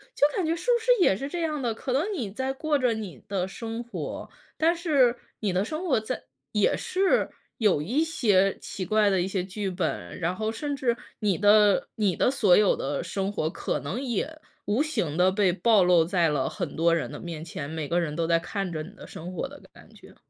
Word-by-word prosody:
就 290 - +5
感 375 - 0
觉 320 - +1
是 335 +1 -6
不 475 - +2
是 - - +3
也 195 - +5
是 275 +7 -5
这 350 - -3
样 305 -3 -1
的。 235 -2 0
可 250 +3 -4
能 335 +11 +1
你 245 - -3
在 260 +6 -2
过 295 +2 0
着 250 -4 +2
你 195 - -7
的 190 -2 -1
生 225 +4 -5
活， 240 - -6 0.3
但 330 +2 +3
是 280 -8 +3 0.2
你 205 -4 -1
的 185 +2 +2
生 310 - -4
活 260 - +3
在 220 +4 -5 0.3
也 210 -1 +3
是 380 +1 +1 0.3
有 200 -10 +3
一 255 - +1
些 205 -12 +2
奇 190 - -6
怪 210 0 +3
的 190 - +2
一 180 - -1
些 190 -2 -1
剧 195 +1 -4
本。 160 - -3
然 175 +2 -1
后 220 +1 -2
甚 285 +5 -3
至 250 -4 0 0.2
你 205 -5 +1
的 205 -1 +5
你 200 -5 +2
的 250 - +2
所 205 -9 +4
有 210 -2 +4
的 - - -3
生 195 0 -2
活， 155 -6 -1
可 - - -3
能 160 - -4
也 275 +5 -3 0.3
无 215 +7 +1
形 180 - -2
地 185 +1 +4
被 195 -2 +3
暴 210 +1 +4
露 175 -2 +5
在 175 -1 +2
了 145 -3 0
很 - - -5
多 165 +1 +3
人 165 - -2
的 - - -7
面 165 -2 -6
前， 145 -3 -6
每 155 -2 -4
个 175 +1 +1
人 155 -3 -2
都 165 0 0
在 165 0 +3
看 195 +1 -4
着 155 - -3
你 170 - -10
的 - - -11
生 170 +3 -8
活 230 - -3
的 285 +1 -13
感 - - -16
觉。 - - -16
210 Hz, 250 characters per minute, -26 LUFS, 180-265 Hz, 0.3 s, 就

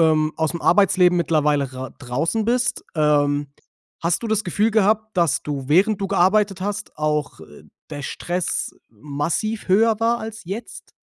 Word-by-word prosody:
ähm, 155 -1 +3
aus 160 -1 0
dem 170 - -6
Arbeitsleben 180 -2 +4
mittlerweile 150 -4 +1
rau 130 0 -6
draußen 150 - -1
bist. 245 +2 0
Ähm, 145 -2 +1 0.5
hast 170 +5 0
du - - -2
das 220 -1 0
Gefühl 205 +5 +1
gehabt, 220 0 +1
dass 170 -6 +2
du 140 -2 -5
während 195 +6 +3
du 195 - -1
gearbeitet 195 +1 +2
hast, 205 +2 -4
auch, 150 - -2
äh, 75 -2 -14 0.3
der 145 - -6
Stress 175 +5 -3
massiv 150 - -3
höher 220 +3 +3
war 235 +1 +2
als 220 0 -7
jetzt? 195 +7 -8
175 Hz, 160 wpm, -21 LUFS, 150-215 Hz, 0.5 s, Arbeitsleben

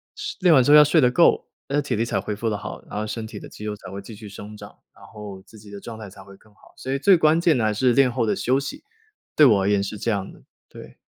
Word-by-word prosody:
是 - - -6
练 180 -3 +4
完 130 - +5
之 145 - +2
后 150 - +9
要 150 - +10
睡 150 +2 +4
得 125 -2 +3
够， 170 +6 +3 0.2
那 145 +1 0
体 140 -2 -4
力 115 - 0
才 - - -2
恢 105 - -4
复 110 +2 -3
得 105 - -2
好， 100 - -8
然 - - -6
后 105 - -2
身 110 +1 -5
体 - - -10
的 - - -10
肌 105 - -10
肉 105 -1 -3
才 95 -3 -12
会 100 +1 -7
继 110 +2 -11
续 105 0 -11
生 105 +2 -10
长， - - -12 0.2
然 - - -18
后 105 -3 -10
自 110 - -16
己 105 0 -15
的 100 -1 -9
状 115 -1 -9
态 105 -2 -9
才 95 0 -14
会 95 0 -16
更 110 - -25
好。 - - -23
所 - - -8
以 - - 0
最 185 +6 +5
关 155 0 +3
键 165 -5 +3
的 115 - 0
还 110 - +1
是 125 +4 +2
练 135 +1 +4
后 120 -1 -1
的 105 - 0
休 130 +2 0
息， 140 0 -6 0.5
对 150 - +6
我 105 -7 +4
而 95 - +1
言 100 -1 +1
是 100 +2 -6
这 110 - -3
样 100 -3 -2
的， - - -18 0.3
对。 - - -13
110 Hz, 340 characters per minute, -22 LUFS, 105-135 Hz, 0.5 s, 要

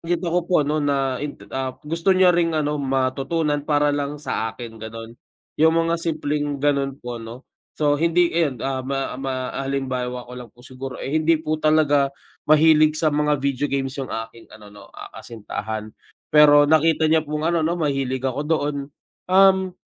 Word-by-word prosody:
Nakita 170 +1 -2
ko 180 - +3
po 155 -5 +3
ano 150 +2 0
na 135 -3 0
in 145 -1 -5 0.2
ah, 130 -1 -3
gusto 165 +5 +1
niya 185 -1 +5
ring 165 -2 +1
ano 150 -1 -1
matutunan 135 +3 -1
para 145 -1 +2
lang 145 0 -2
sa 115 -6 -3
akin 115 0 -10
ganon, 115 +1 -8 0.5
yung 160 +1 +5
mga 165 0 +1
simpleng 150 -3 -2
ganun 140 -1 0
po 120 -3 -7
no. 115 +4 -10 0.3
So 145 -1 +2
hindi, 170 +1 +2
ayun 150 -8 0
ah, 135 -1 -2
ma 135 +1 -3
ma 135 -1 -3 0.2
ah, 135 0 -4
halimbawa 125 -2 -3
ko 125 - -13
lang 120 - -10
po 120 - -19
siguro 130 0 -8
eh 135 - -5
hindi 165 +1 +3
po 155 0 -3
talaga 150 -3 +3 0.4
mahilig 155 0 +5
sa 155 -1 +1
mga 150 0 +1
video 140 +1 -1
games 135 -1 -2
yung 135 - -5
aking 115 +1 -7
ano 105 -1 -15
no, 105 - -14
ah, - - -12
kasintahan. 110 -1 -6 0.4
Pero 150 -1 +7
nakita 160 0 +3
niya 160 -1 +2
pong 150 +1 -3
ano 170 0 +1
no 170 +2 0
mahilig 135 -4 -1
ako 135 +1 -2
doon, 150 -2 0 0.5
um, 190 0 +4
145 Hz, 180 wpm, -22 LUFS, 130-155 Hz, 0.5 s, Pero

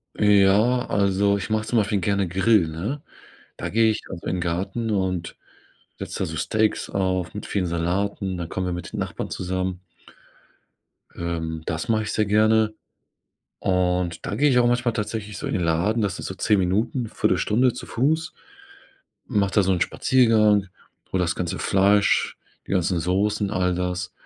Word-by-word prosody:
Ja, 105 +4 +4
also, 100 0 +2
ich 95 - -5
mache 110 0 0
zum 120 - +1
Beispiel 105 -1 +1
gerne 100 +1 0
Grill, 95 +1 +3
ne? 95 - -4 0.6
Da - - -4
gehe 115 +1 +3
ich 110 - -2
also 85 -3 -7
in 90 - -1
Garten 95 +7 -2
und 95 -4 -1 0.6
setze - - -6
da - - 0
so 80 0 -5
Steaks 110 0 0
auf 95 -3 -1
mit 105 - -6
vielen 95 -3 -1
Salaten, 90 +3 -1
dann 85 - -4
kommen 95 -1 -3
wir 90 - -2
mit 85 -1 -7
den - - -3
Nachbarn - - -4
zusammen. 95 0 -3 1.3
Ähm, 80 -1 -3
das 80 +7 -3
mache 110 -1 +2
ich 105 - -4
sehr 110 - +1
gerne. 110 +1 +3 0.9
Und 90 -2 0
da - - -3
gehe 145 +1 +3
ich 125 -2 +4
auch 120 - +4
manchmal 120 -1 +1
tatsächlich 105 -2 -4
so - - -5
in - - -3
den 90 - 0
Laden, 90 +8 +1
das 100 -2 -1
ist - - -5
so 95 - -6
10 100 +1 +2
Minuten, 110 +7 0
1/4 - - +1
Stunde 125 +3 +2
zu - - -8
Fuß. 160 +6 0 0.9
Mache 100 -5 +1
da 105 - +5
so 95 - +2
'n 90 - 0
Spaziergang, 110 -6 +3 0.4
hole 95 - +1
das 85 -1 0
ganze 85 -2 -3
Fleisch, 100 +1 +2 0.3
die - - -12
ganzen 90 -2 +1
Soßen, 100 +4 0
all 90 -2 +1
das. 90 0 -3
100 Hz, 175 wpm, -23 LUFS, 90-110 Hz, 1.3 s, da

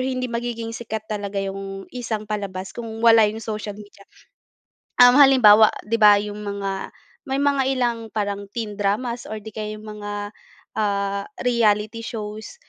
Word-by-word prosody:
hindi 255 -1 -3
magiging 235 -1 -3
sikat 220 -2 -6
talaga 200 -1 -3
yung 195 0 -6
isang 225 -4 -4
palabas 200 -3 -5
kung 225 -1 -7
wala 225 -2 +7
yung 220 +2 -5
social 215 -2 -5
media. 205 -1 -15 0.9
Um, 245 +2 +7
halimbawa 225 -6 +8 0.2
'di 230 +2 -1
ba 210 -1 +8
yung 205 0 -3
mga, 195 -1 -4 0.3
may 265 - -1
mga 280 -2 +2
ilang 240 -2 0
parang 205 -1 -3
teen 215 -3 -4
dramas 235 +4 -1
or 215 -1 -6
'di 220 - -8
kaya 215 0 -5
yung 215 - -12 0.2
mga, 205 0 -5 0.5
ah, 200 -1 -1 0.2
reality 220 -2 +1
shows, 220 - -7
215 Hz, 150 wpm, -22 LUFS, 205-230 Hz, 0.9 s, halimbawa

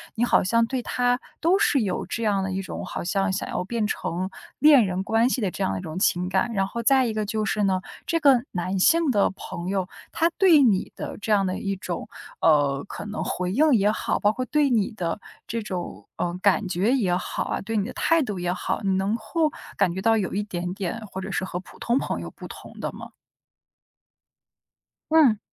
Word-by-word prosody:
你 230 - 0
好 240 - +4
像 230 +4 +3
对 255 -1 -2
他 245 0 +1 0.2
都 350 +5 +4
是 285 - +3
有 195 - -2
这 230 - -4
样 200 -3 +1
的 190 - -2
一 190 +1 -2
种 - - -6
好 - - -5
像 195 +1 0
想 - - -3
要 - - -2
变 220 +1 -1
成， 185 -2 -3 0.3
恋 290 -7 +7
人 185 0 -2
关 225 +5 +2
系 255 - 0
的 195 - +1
这 - - -4
样 95 - 0
的 95 - -3
一 - - -6
种 160 +3 -6
情 180 -1 +1
感。 195 +5 0
然 195 -1 +1
后 235 +3 -5
再 265 0 +4
一 220 - -2
个 215 -1 -1
就 215 +1 -2
是 210 0 0
呢， 190 -1 +1 0.2
这 335 -1 0
个 270 -5 +5
男 185 +2 -2
性 330 - +4
的 205 -6 +3
朋 170 +1 -7
友， 190 -2 -1 0.2
他 335 +1 +2
对 340 -7 +6
你 210 -7 +2
的 - - -6
这 215 +1 -4
样 195 -2 +3
的 185 - -2
一 195 0 -2
种， 180 -2 -5 0.3
呃， 145 -3 +3
可 205 - -7
能 210 +1 -4
回 180 0 -2
应 300 +7 +4
也 210 -1 +4
好， - - -1
包 205 - +3
括 255 +3 -3
对 295 -1 +2
你 230 -1 +1
的 180 -3 -3 0.3
这 230 0 -2
种， 175 - -6
呃， 175 0 -2
感 200 -1 +3
觉 195 +8 +1
也 190 -9 +2
好 180 - -2
啊， - - -3
对 225 +2 -4
你 200 - +1
的 - - -6
态 330 -1 +2
度 210 -8 -3
也 175 0 -1
好， - - -2
你 190 -1 +1
能 195 +3 0
够 300 +8 0 0.3
感 170 - +2
觉 190 - -4
到 225 +1 +3
有 195 - -2
一 205 +1 0
点 180 -2 -4
点 200 +4 -4
或 190 0 -6
者 - - -5
是 - - -1
和 180 -1 -4
普 - - -16
通 240 +2 +1
朋 - - -2
友 - - -6
不 - - -11
同 - - -11
的 - - -3
吗？ - - -9 2.0
嗯。 275 -10 +5
205 Hz, 245 characters per minute, -25 LUFS, 185-240 Hz, 2.0 s, 恋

